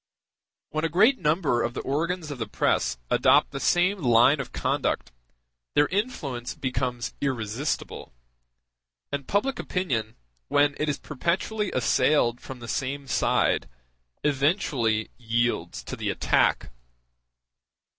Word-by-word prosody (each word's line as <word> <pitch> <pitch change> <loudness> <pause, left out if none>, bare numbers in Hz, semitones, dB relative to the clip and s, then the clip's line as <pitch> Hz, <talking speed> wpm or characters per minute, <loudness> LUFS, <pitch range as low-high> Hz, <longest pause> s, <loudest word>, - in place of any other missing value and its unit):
When 155 +1 -2
a 165 - +1
great 215 +11 +4
number 150 -6 +1
of 120 - -2
the - - -2
organs 160 +3 -2
of 140 - -6
the 115 - -3
press - - 0
adopt - - +4
the 135 - -4
same 180 +6 +2
line 125 +3 +5
of 135 - -5
conduct, - - -1 0.6
their 145 - +5
influence 150 - -3
becomes 125 -2 -2
irresistible; 130 +1 -3 1.0
and 140 -1 -4
public 245 +7 0
opinion, 120 - -2 0.3
when 145 - +3
it 150 - 0
is 145 - -1
perpetually 185 - -2
assailed 125 -1 +2
from 130 -2 -9
the 120 - -8
same 135 +3 -3
side, 130 - +1 0.5
eventually 135 - +1
yields 115 - -1
to - - -6
the - - -3
attack. - - +1
140 Hz, 125 wpm, -26 LUFS, 120-165 Hz, 1.0 s, line